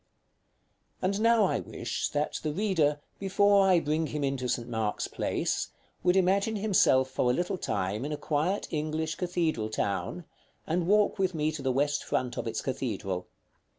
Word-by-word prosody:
§ -, -, -44 dB
X. -, -, -45 dB
And 200 Hz, +3 st, +1 dB
now 230 Hz, -2 st, +5 dB
I -, -, +1 dB
wish -, -, -3 dB
that 145 Hz, +1 st, -1 dB
the 155 Hz, -, -1 dB
reader, 160 Hz, -5 st, +1 dB, 0.2 s
before 200 Hz, 0 st, +4 dB
I 185 Hz, -2 st, +5 dB
bring 155 Hz, 0 st, 0 dB
him 150 Hz, -1 st, -3 dB
into 135 Hz, -2 st, -1 dB
St. 120 Hz, -1 st, -1 dB
Mark's 110 Hz, -3 st, -1 dB
Place, -, -, -1 dB, 0.3 s
would 180 Hz, 0 st, +3 dB
imagine 195 Hz, +4 st, +2 dB
himself 190 Hz, -11 st, +3 dB
for 130 Hz, -1 st, +1 dB
a 125 Hz, -, +3 dB
little 180 Hz, +3 st, -1 dB
time 100 Hz, +5 st, -2 dB
in 145 Hz, -, -3 dB
a 150 Hz, -, -2 dB
quiet 160 Hz, +8 st, -1 dB
English 155 Hz, +1 st, -1 dB
cathedral 165 Hz, -, -1 dB
town, 100 Hz, -, -2 dB, 0.4 s
and 170 Hz, +1 st, 0 dB
walk 210 Hz, +1 st, +3 dB
with 185 Hz, -2 st, +1 dB
me 155 Hz, 0 st, +1 dB
to 155 Hz, -2 st, -6 dB
the 135 Hz, -1 st, 0 dB
west 145 Hz, +3 st, +1 dB
front 125 Hz, -1 st, -1 dB
of -, -, -3 dB
its 115 Hz, -1 st, -3 dB
cathedral. 100 Hz, -8 st, -3 dB
155 Hz, 180 wpm, -29 LUFS, 130-185 Hz, 0.4 s, now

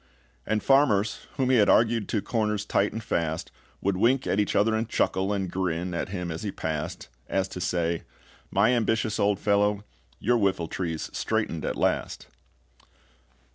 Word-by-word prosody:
And 110 Hz, 0 st, 0 dB
farmers, 115 Hz, -7 st, +3 dB
whom 130 Hz, -1 st, +2 dB
he 130 Hz, -, +5 dB
had 105 Hz, -, +4 dB
argued 115 Hz, -2 st, +3 dB
To 105 Hz, -, 0 dB
corners 105 Hz, -3 st, -1 dB
tight 100 Hz, 0 st, +1 dB
and 110 Hz, +1 st, -5 dB
fast, 80 Hz, -3 st, -2 dB, 0.3 s
Would 100 Hz, -1 st, 0 dB
wink 125 Hz, +6 st, +3 dB
at 100 Hz, -, 0 dB
each 105 Hz, -, 0 dB
other 110 Hz, +2 st, +3 dB
and 110 Hz, +1 st, -1 dB
chuckle, 95 Hz, -1 st, +1 dB
And 100 Hz, -2 st, -1 dB
grin 90 Hz, -1 st, -2 dB
at 85 Hz, -, -3 dB
him 90 Hz, -3 st, -4 dB
as 80 Hz, -, -5 dB
he 105 Hz, -, -3 dB
passed, 80 Hz, -7 st, -4 dB, 0.2 s
As 95 Hz, 0 st, 0 dB
to 90 Hz, -, -6 dB
say, 85 Hz, -2 st, 0 dB, 0.5 s
"My -, -, +3 dB
ambitious 110 Hz, -2 st, 0 dB
old 100 Hz, 0 st, +2 dB
fellow, 105 Hz, 0 st, +1 dB, 0.3 s
your 120 Hz, +2 st, +2 dB
whiffletree's 85 Hz, -4 st, -2 dB
straightened 110 Hz, -8 st, -1 dB
at -, -, -1 dB
last." -, -, -1 dB
100 Hz, 165 wpm, -26 LUFS, 90-110 Hz, 0.5 s, he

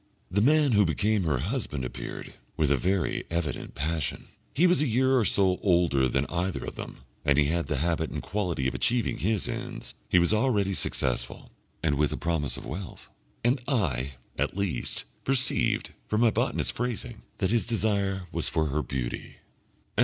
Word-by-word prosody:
The 100 Hz, +3 st, +2 dB
man 150 Hz, +3 st, +4 dB
who 105 Hz, -2 st, +5 dB
became 100 Hz, +3 st, +1 dB
her 75 Hz, -5 st, +2 dB
husband 75 Hz, -, -2 dB
appeared, -, -, -7 dB, 0.2 s
with 75 Hz, -3 st, +2 dB
a -, -, +5 dB
very 90 Hz, +2 st, 0 dB
evident 85 Hz, -3 st, -3 dB
passion. 80 Hz, +3 st, -2 dB, 0.2 s
He 170 Hz, -, +3 dB
was 180 Hz, -3 st, +4 dB
a 150 Hz, -, +2 dB
year 130 Hz, +3 st, +3 dB
or 120 Hz, -4 st, +3 dB
so 95 Hz, -2 st, +3 dB
older 85 Hz, -8 st, +3 dB
than 70 Hz, +3 st, +1 dB
either 90 Hz, +3 st, -2 dB
of -, -, -5 dB
them, -, -, -8 dB, 0.2 s
and 70 Hz, -1 st, +3 dB
he 75 Hz, -, +5 dB
had 85 Hz, +3 st, 0 dB
the 75 Hz, -, -1 dB
habit 80 Hz, +1 st, 0 dB
and -, -, -4 dB
quality 85 Hz, -7 st, -1 dB
of 65 Hz, -, -1 dB
achieving 115 Hz, -, +1 dB
his 105 Hz, 0 st, 0 dB
ends; -, -, -5 dB, 0.2 s
he -, -, +4 dB
was 85 Hz, +4 st, +4 dB
already 105 Hz, -4 st, +2 dB
successful, 60 Hz, -8 st, -2 dB, 0.3 s
and 75 Hz, -3 st, +1 dB
with 75 Hz, -1 st, +3 dB
the -, -, -3 dB
promise 80 Hz, -6 st, 0 dB
of -, -, -8 dB
wealth, 90 Hz, +5 st, -7 dB, 0.3 s
and 125 Hz, +2 st, +2 dB
I, 70 Hz, -, 0 dB, 0.3 s
at -, -, 0 dB
least, 100 Hz, -3 st, -2 dB, 0.2 s
perceived, 135 Hz, -1 st, +2 dB, 0.2 s
from 105 Hz, +1 st, +1 dB
my 115 Hz, -2 st, +5 dB
botanist's -, -, 0 dB
phrasing, 120 Hz, -1 st, -4 dB, 0.2 s
that 95 Hz, -1 st, 0 dB
his 115 Hz, -1 st, +2 dB
desire 100 Hz, -5 st, 0 dB
was -, -, 0 dB
for 80 Hz, -, +1 dB
her 75 Hz, +3 st, 0 dB
beauty. 65 Hz, -3 st, -4 dB
90 Hz, 180 wpm, -28 LUFS, 75-110 Hz, 0.3 s, who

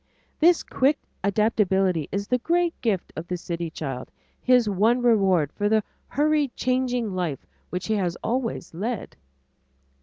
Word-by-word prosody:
This 340 Hz, +2 st, +5 dB
quick 280 Hz, +3 st, +2 dB, 0.3 s
adaptability 195 Hz, -5 st, +2 dB
is 200 Hz, +1 st, -2 dB
the 250 Hz, -, +2 dB
great 340 Hz, +4 st, +1 dB
gift 205 Hz, -6 st, -1 dB
of 165 Hz, +2 st, -6 dB
the 180 Hz, -, -2 dB
city 170 Hz, -1 st, -4 dB
child, 135 Hz, -5 st, -5 dB, 0.3 s
his 250 Hz, -3 st, +4 dB
one 220 Hz, +5 st, +2 dB
reward 190 Hz, -, +3 dB
for 205 Hz, 0 st, 0 dB
the 220 Hz, 0 st, +3 dB, 0.2 s
hurried 295 Hz, -2 st, +1 dB
changing 250 Hz, -4 st, 0 dB
life 175 Hz, -7 st, -3 dB, 0.2 s
which 180 Hz, +1 st, -4 dB
he 220 Hz, -, 0 dB
has 180 Hz, -3 st, -1 dB
always 230 Hz, -7 st, -2 dB
led. 215 Hz, +6 st, -4 dB
210 Hz, 145 wpm, -25 LUFS, 180-250 Hz, 0.3 s, This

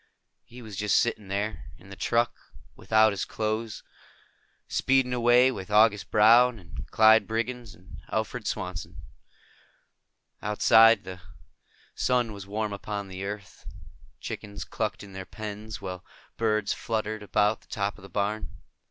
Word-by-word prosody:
He 120 Hz, +1 st, -13 dB
was 110 Hz, -3 st, -9 dB
just 105 Hz, -1 st, +2 dB
sitting 110 Hz, -4 st, 0 dB
there, 100 Hz, +2 st, -3 dB
in 100 Hz, -, -16 dB
the -, -, -8 dB
truck, 120 Hz, +3 st, +1 dB, 0.4 s
without 110 Hz, 0 st, +3 dB
his 95 Hz, -, -3 dB
clothes, 110 Hz, 0 st, -3 dB, 0.8 s
speeding 130 Hz, -1 st, +2 dB
away 125 Hz, +1 st, +5 dB
with 95 Hz, -6 st, -7 dB
August 105 Hz, -3 st, +4 dB
Brown 115 Hz, +3 st, +6 dB
and 90 Hz, -4 st, -10 dB
Clyde 110 Hz, -1 st, +5 dB
Briggs 115 Hz, 0 st, -3 dB
and 90 Hz, 0 st, -14 dB
Alfred -, -, -2 dB
Swanson. 85 Hz, -2 st, -5 dB, 1.4 s
Outside, 110 Hz, +1 st, +5 dB
the 95 Hz, -1 st, -9 dB, 0.7 s
sun 125 Hz, -3 st, 0 dB
was 100 Hz, -1 st, -9 dB
warm 105 Hz, 0 st, -2 dB
upon 100 Hz, 0 st, -5 dB
the 95 Hz, +1 st, -6 dB
earth. 100 Hz, 0 st, -8 dB, 0.5 s
Chickens 100 Hz, -1 st, -6 dB
clucked 110 Hz, -2 st, -4 dB
in 100 Hz, -1 st, -12 dB
their 95 Hz, 0 st, -6 dB
pens, 105 Hz, +2 st, -7 dB
while 90 Hz, -2 st, -6 dB, 0.3 s
birds 110 Hz, -2 st, 0 dB
fluttered 110 Hz, -1 st, -3 dB
about 105 Hz, +1 st, +1 dB
the -, -, -25 dB
top 100 Hz, -2 st, -3 dB
of -, -, -16 dB
the 100 Hz, -, -12 dB
barn. 105 Hz, +1 st, -2 dB
105 Hz, 140 wpm, -27 LUFS, 100-115 Hz, 1.4 s, Brown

